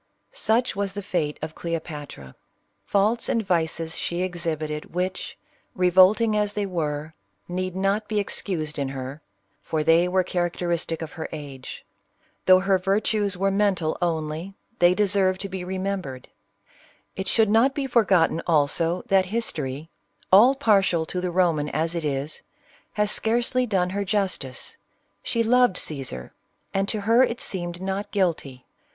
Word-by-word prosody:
Such 240 - +1
was 200 -1 -2
the 205 0 -5
fate 165 -6 -1
of 155 0 -4
Cleopatra. 150 - -6 0.6
^Faults 210 +4 +2
and 225 -2 0
vices 165 -2 -1
she 175 +1 -2
exhibited, 160 -4 -4
which, 185 +1 -3 0.4
revolting 190 +5 +5
as 210 -1 0
they 205 -1 -1
were, 155 -4 -3 0.3
need 185 +1 -3
not 195 +3 0
be 215 -1 0
excused 160 -7 -3
in 140 -1 -1
her, 135 +2 -6 0.4
for 155 -1 -2
they 165 +2 +4
were 185 +1 +2
characteristic 175 -2 -2
of 155 - -7
her 160 - -6
age. 140 -4 -8 0.6
Though 185 0 +7
her 190 0 +2
virtues 200 +1 0
were 195 +1 +1
mental 195 -5 +1
only, 165 +2 -2 0.2
they 175 +1 +5
deserve 195 -2 +3
to 195 +1 -5
be 185 -1 -5
remembered. 185 -8 -4 0.9
It 190 0 -4
should 220 +1 +3
not 245 +6 +4
be 285 -3 -1
forgotten 190 -10 +3
also, 165 +2 +2
that 190 -1 +3
History 160 - -3 0.2
— 100 - -35
all 240 +8 +8
partial 195 -10 +3
to 180 +3 -4
the 180 - -1
Roman 170 -5 +1
as 165 +2 -1
it 170 -2 -3
is 145 +1 -3 0.3
— - - -31
has 210 0 +1
scarcely 240 +2 +1
done 185 -4 +1
her 200 +1 -1
justice. 185 - -2 0.4
She 230 - 0
loved 245 -2 +4
Cajsar. 130 - -5 0.4
and 195 +1 0
to 215 - -1
her 230 +4 +4
it 240 -2 +1
seemed 175 -1 -4
not 195 +2 -3
guilty. 160 -10 -1
185 Hz, 150 wpm, -24 LUFS, 160-200 Hz, 0.9 s, all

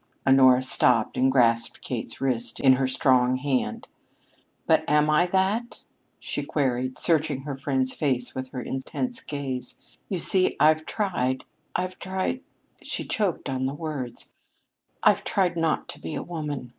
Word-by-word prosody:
Honora 130 -1 +6
stopped 115 -3 +2
and 130 +1 +3
grasped 115 -3 +2
Kate's - - -5
wrist 120 -4 -2
in 135 -1 +6
her 130 0 +1
strong 130 -1 +3
hand. 130 0 -2 0.8
"But - - +3
am 150 +1 +3
I 170 +4 +4
that?" 195 +6 0 0.4
she - - -4
queried, 130 -3 -1
searching 155 -5 +1
her 140 0 -5
friend's 130 -1 -1
face 130 -4 -1
with 130 0 -4
her 125 -1 -6
intense 235 - -4
gaze. 135 -3 -5 0.3
"You 190 - -1
see, 185 +2 +4
I've 155 +1 +4
tried 130 - -1 0.3
I've 185 0 -2
tried 190 +7 -2 0.2
" - - -40
She - - -5
choked 200 -6 -1
on 130 -1 -1
the 135 - -4
words. 145 -6 -6 0.7
"I've - - +4
tried 185 -3 +1
not 165 -2 0
to - - -8
be 155 - -5
a - - -3
woman!" 150 -7 -5
135 Hz, 155 wpm, -25 LUFS, 130-165 Hz, 0.8 s, Honora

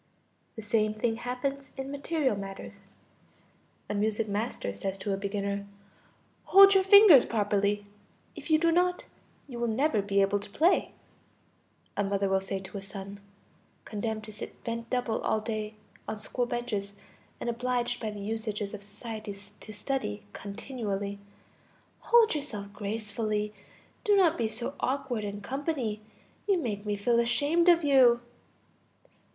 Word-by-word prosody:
The 220 - -7
same 215 0 +1
thing 225 +1 0
happens 260 +3 -3
in 270 +1 -4
material 285 -3 0
matters; 195 -1 -8 1.1
a - - -3
music 215 +1 0
master 205 - -2
says 190 - -4
to 195 +1 -2
a - - +1
beginner: 200 0 -3 0.8
"Hold 395 +1 +9
your 385 -1 +5
fingers 385 - +9
properly; 205 -1 0 0.5
if - - -9
you 310 - +6
do 335 +1 +3
not, 360 +1 +2 0.4
you 245 -4 -7
will 235 - 0
never 230 0 +2
be 200 0 +1
able 195 +1 +3
to 205 +1 -10
play." 330 - +2 1.0
A 205 - +1
mother 200 0 0
will 190 0 +2
say 195 0 -3
to 190 +1 -7
a - - -10
son 195 +1 -8 0.7
condemned 215 0 -3
to 215 0 -9
sit 205 - -9
bent 230 0 -4
double 245 -3 -1
all 220 - +1
day 215 -1 -4 0.3
on 215 - -4
school 245 +3 -2
benches, 230 -5 -3 0.5
and - - -5
obliged 245 0 -1
by 220 - -2
the 210 -1 -7
usages 215 -1 -3
of 210 - -6
society 210 0 -7 0.2
to 215 - -10
study 210 -2 -3
continually: 200 -2 -4 0.8
"Hold 470 -2 +5
yourself 210 -10 -5
gracefully, 210 0 -2 0.5
do 415 - +4
not 350 -5 +5
be 230 - 0
so 235 +5 -4
awkward 260 -4 -1
in 205 0 -5
company, 265 -4 -2 0.5
you 395 -2 +4
make 210 -9 -3
me 205 - +1
feel 235 +4 +2
ashamed 290 +9 +3
of 340 -1 +5
you." 260 -4 +6
220 Hz, 150 wpm, -29 LUFS, 205-260 Hz, 1.1 s, Hold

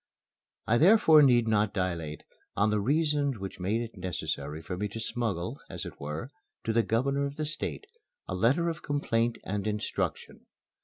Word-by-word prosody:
I 120 +2 +3
therefore 165 -4 +7
need 120 -5 +5
not 105 -2 +2
dilate 85 -5 -2 0.3
on 105 +1 +2
the 105 - +2
reasons 145 +1 +1
which 95 -1 -7
made 100 +6 0
it 115 -1 -6
necessary 75 -4 -3
for 85 +3 -5
me 105 +3 -2
to 105 +3 -7
smuggle, 110 -6 -3
as - - -6
it - - -9
were, 75 - -5 0.3
to 115 - -1
the 115 - +4
Governor 140 +6 +1
of 140 - -8
the 155 - -2
State, 155 - -3 0.4
a - - -3
letter 125 - +2
of 165 -2 -3
complaint 120 -5 0
and 105 +1 -3
instruction. 105 0 -3
115 Hz, 170 wpm, -29 LUFS, 95-140 Hz, 0.4 s, therefore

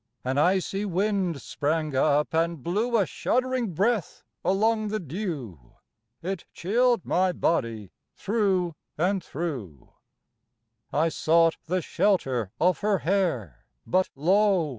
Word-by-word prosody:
An 130 +2 0
icy 190 +4 +1
wind 190 -4 0
sprang 155 -1 -1
up, 145 +3 +2
and 165 -3 0
blew 220 +7 +1
A 200 - +3
shuddering 255 -1 -1
breath 205 +1 0 0.2
along 215 +3 +2
the 215 +1 -2
dew, 145 - -6 0.5
It 190 0 -4
chilled 235 +4 +1
my 185 +1 +2
body 115 - -1 0.2
thro' 190 -6 0 0.2
and 185 +3 +1
thro'. 130 - -6 1.0
I 160 +3 +2
sought 165 +1 +3
the 180 +1 0
shelter 135 - +1
of 180 0 +3
her 205 -1 +2
hair, 130 - -1 0.2
But 185 +1 +1
lo! 185 +2 +3
175 Hz, 120 wpm, -26 LUFS, 150-200 Hz, 1.0 s, A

